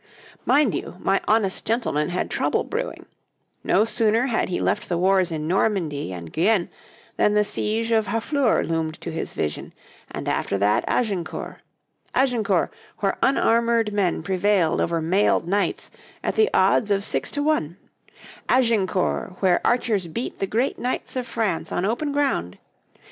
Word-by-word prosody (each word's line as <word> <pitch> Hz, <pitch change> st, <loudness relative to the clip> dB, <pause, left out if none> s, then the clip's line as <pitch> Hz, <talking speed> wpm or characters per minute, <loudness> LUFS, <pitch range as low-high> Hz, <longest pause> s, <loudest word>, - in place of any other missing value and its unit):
Mind 285 Hz, -7 st, +4 dB
you, -, -, -5 dB
my 195 Hz, +1 st, +1 dB
honest 210 Hz, -3 st, +1 dB
gentleman 220 Hz, -10 st, 0 dB
had 180 Hz, +1 st, -2 dB
trouble -, -, 0 dB
brewing: -, -, -4 dB, 0.6 s
no 215 Hz, -, +3 dB
sooner 225 Hz, +1 st, +2 dB
had 235 Hz, -7 st, 0 dB
he 180 Hz, -, -1 dB
left -, -, -1 dB
the 175 Hz, -, 0 dB
wars 185 Hz, 0 st, +3 dB
in 155 Hz, -2 st, -4 dB
Normandy 170 Hz, -, 0 dB
and 85 Hz, -3 st, -8 dB
Guienne 185 Hz, +1 st, +2 dB, 0.5 s
than 210 Hz, -, +3 dB
the 210 Hz, 0 st, +3 dB
siege 225 Hz, +2 st, -1 dB
of 220 Hz, -2 st, +2 dB
Harfleur 235 Hz, +2 st, +1 dB
loomed 160 Hz, -1 st, -2 dB
to 170 Hz, -, -5 dB
his 160 Hz, -, -4 dB
vision, 75 Hz, -, -4 dB, 0.3 s
and -, -, -6 dB
after 100 Hz, -, 0 dB
that 100 Hz, +2 st, +2 dB
Agincourt 195 Hz, -8 st, -2 dB, 0.6 s
Agincourt, 225 Hz, -9 st, +1 dB, 0.3 s
where 195 Hz, -1 st, 0 dB
unarmoured 230 Hz, -4 st, +2 dB
men 190 Hz, -5 st, 0 dB
prevailed 190 Hz, -1 st, +1 dB
over 165 Hz, -1 st, 0 dB
mailed 175 Hz, +1 st, +2 dB
knights 200 Hz, +3 st, -1 dB, 0.3 s
at -, -, 0 dB
the 435 Hz, 0 st, +3 dB
odds 195 Hz, +3 st, +3 dB
of 200 Hz, -1 st, +1 dB
six -, -, -1 dB
to 290 Hz, -, -2 dB
one; 185 Hz, -, 0 dB, 0.7 s
Agincourt, 210 Hz, -7 st, +1 dB
where 185 Hz, -3 st, +3 dB
archers 225 Hz, -7 st, +1 dB
beat 230 Hz, +10 st, -5 dB
the 195 Hz, -, -1 dB
great 235 Hz, +7 st, -1 dB
knights 250 Hz, +1 st, -3 dB
of 255 Hz, -1 st, -3 dB
France 225 Hz, -7 st, -2 dB
on 180 Hz, -, -1 dB
open 240 Hz, +8 st, -1 dB
ground! 275 Hz, -, -1 dB
205 Hz, 155 wpm, -23 LUFS, 175-230 Hz, 0.7 s, Mind